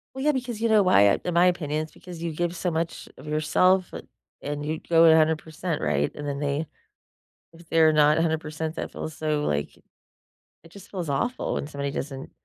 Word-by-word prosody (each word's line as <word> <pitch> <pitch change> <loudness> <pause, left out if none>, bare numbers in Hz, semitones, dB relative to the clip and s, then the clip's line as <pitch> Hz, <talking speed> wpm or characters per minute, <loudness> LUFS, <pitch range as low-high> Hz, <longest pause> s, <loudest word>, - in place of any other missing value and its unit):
Well, 265 - -4
yeah, 300 - +4
because 250 -5 -4
you 230 - +2
know 215 -2 +5
why? 180 - +5
Uh, 100 - +3
in 180 - -1
my 175 +2 +5
opinion, 155 -4 0
it's 155 - -11
because 175 -1 -11
you 170 -1 -3
give 175 +2 -2
so 180 +1 -1
much 165 0 -3
of - - -13
yourself, 175 +5 +2
bu - - -7 0.4
and 145 0 -4
you 155 +1 -2
go 165 0 +6
100%, 160 +1 +2
right? 75 -1 0
And 145 0 -7
then 140 -1 -3
they 145 +2 -2 0.9
if 165 0 -16
they're 160 -1 +4
not 150 0 +4
100%, 160 -1 -2
that - - -5
feels 160 - -6
so, 155 -1 -1
like 75 0 -2 0.9
it 165 - -16
just 200 0 -13
feels 180 -5 -4
awful 235 - -1
when - - -3
somebody 140 -1 -4
doesn't 135 -1 -6
160 Hz, 205 wpm, -25 LUFS, 150-175 Hz, 0.9 s, go